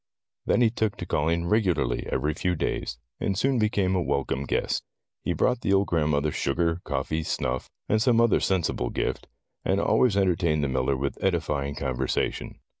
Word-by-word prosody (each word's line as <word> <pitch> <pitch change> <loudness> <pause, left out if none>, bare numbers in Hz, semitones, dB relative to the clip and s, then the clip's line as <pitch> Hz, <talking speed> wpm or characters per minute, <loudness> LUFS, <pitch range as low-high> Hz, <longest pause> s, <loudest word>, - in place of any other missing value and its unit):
Then - - +3
he 115 -2 +4
took 110 -3 -1
to - - -5
calling 85 +3 0
regularly 90 - +1
every 75 +4 0
few 90 +3 -1
days, - - -2 0.2
and 95 - -1
soom 135 +2 +2
became 105 -4 +1
a 90 - +1
welcome 70 -3 -1
guest. - - 0 0.4
He - - 0
brought 125 -1 +1
the 100 - +1
old 100 0 +2
grandmother 75 -2 +1
sugar^ 85 +6 0
coffee, 80 +1 -2
snuff, 65 -4 -2 0.2
or 110 - +2
some 115 0 +3
other 115 -2 +4
sensible 85 -9 0
gift, - - -2 0.4
and - - +1
always 115 -6 +3
entertained 85 -5 +2
the 70 - 0
miller 65 +1 0
with 70 +1 -3
edifying 75 -6 0
conversation. 65 -4 -2
85 Hz, 170 wpm, -26 LUFS, 70-100 Hz, 0.4 s, he